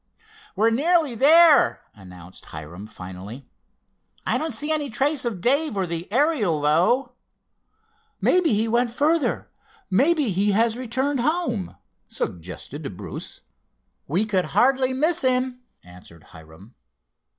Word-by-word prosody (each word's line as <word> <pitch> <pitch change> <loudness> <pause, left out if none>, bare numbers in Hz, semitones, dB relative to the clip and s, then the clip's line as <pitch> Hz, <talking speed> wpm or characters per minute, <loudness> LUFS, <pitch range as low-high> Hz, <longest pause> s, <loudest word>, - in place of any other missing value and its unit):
"We're 220 +4 +2
nearly 310 +2 +2
there," 310 +5 +5
announced 90 -3 -14
Hiram 80 +7 -9
finally. 95 +8 -10 0.8
"I - - 0
don't 315 0 -3
see 295 +2 -2
any 300 -2 -1
trace 270 +3 0
of 215 -7 -3
Dave 280 - +1
or 190 - 0
the 170 +2 -6
Ariel, 240 - +1
though." 180 - +2 1.1
"Maybe 360 -4 +2
he 220 +2 0
went 240 +2 +1
further—maybe 300 - 0
he 200 +3 +1
has 225 +2 +2
returned 260 +3 -2
home," 250 - -1 0.3
suggested 90 - -6
Bruce. - - -8 0.7
"We 180 +9 0
could 190 -4 0
hardly 260 0 +2
miss 315 +6 +1
him," 255 -1 0 0.2
answered 90 -2 -16
Hiram. 80 +8 -15
235 Hz, 115 wpm, -23 LUFS, -, 1.1 s, there